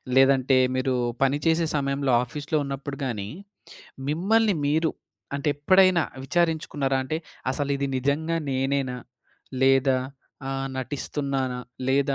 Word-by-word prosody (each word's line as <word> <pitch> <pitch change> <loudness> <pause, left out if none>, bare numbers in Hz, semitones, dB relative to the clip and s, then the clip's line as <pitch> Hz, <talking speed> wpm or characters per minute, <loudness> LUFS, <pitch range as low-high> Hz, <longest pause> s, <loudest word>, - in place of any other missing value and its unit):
లేదంటే 135 0 +5 0.2
మీరు 130 0 0 0.3
పనిచేసే 160 +5 +2
సమయంలో 140 -2 0
ఆఫీస్‌లో 145 +4 -2
ఉన్నప్పుడు 140 +1 -5
గాని, 105 -6 -3 0.8
మిమ్మల్ని 205 +7 +2
మీరు, 160 +2 +2 0.5
అంటే 140 +2 -1
ఎప్పుడైనా 185 +3 +5 0.2
విచారించుకున్నారా 145 -3 0
అంటే, 155 +4 -2 0.3
అసలు 140 +1 -2
ఇది 140 0 -1
నిజంగా 155 +5 0
నేనేనా? 135 -1 0 0.6
లేదా 135 0 +4 0.5
ఆహ్, 135 0 -2
నటిస్తున్నానా? 130 0 -2 0.3
లేదా 140 +1 +2
140 Hz, 105 wpm, -25 LUFS, 135-155 Hz, 0.8 s, లేదంటే